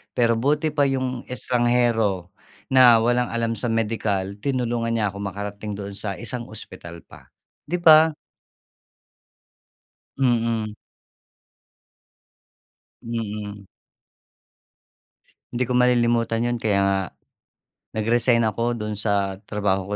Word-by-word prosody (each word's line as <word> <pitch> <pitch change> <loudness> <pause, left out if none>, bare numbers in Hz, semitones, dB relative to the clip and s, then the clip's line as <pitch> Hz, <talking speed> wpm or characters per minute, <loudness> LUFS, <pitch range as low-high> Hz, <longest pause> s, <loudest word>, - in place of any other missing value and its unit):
Pero 115 -1 +2
buti 150 +5 +1
pa 145 -1 +2
yung 130 -2 -2
estranghero 120 -7 0 0.4
na 125 -3 +7
walang 120 +1 +2
alam 115 -1 0
sa 120 - -2
medikal, 105 -4 -1
tinulungan 120 -2 -1
niya 105 -3 0
ako 100 - -9
makarating 100 +1 -5
doon 100 0 -6
sa 100 -3 -3
isang 120 +2 -6
ospital 85 -6 -10
pa, - - -17 0.4
'di 175 +3 -2
ba? 160 0 +7 2.1
Mm. 115 -4 0 2.3
Mm. 105 -3 -5 1.9
Hindi 125 +1 0
ko - - 0
malilimutan 120 -2 +2
'yon, 120 0 0
kaya 105 -4 +1
nga 100 0 +2 1.0
nag-resign 115 +2 +3
ako 115 +2 0
do'n 105 -2 -4
sa 100 -2 0
trabaho 100 -1 -1
115 Hz, 100 wpm, -23 LUFS, 105-120 Hz, 2.3 s, na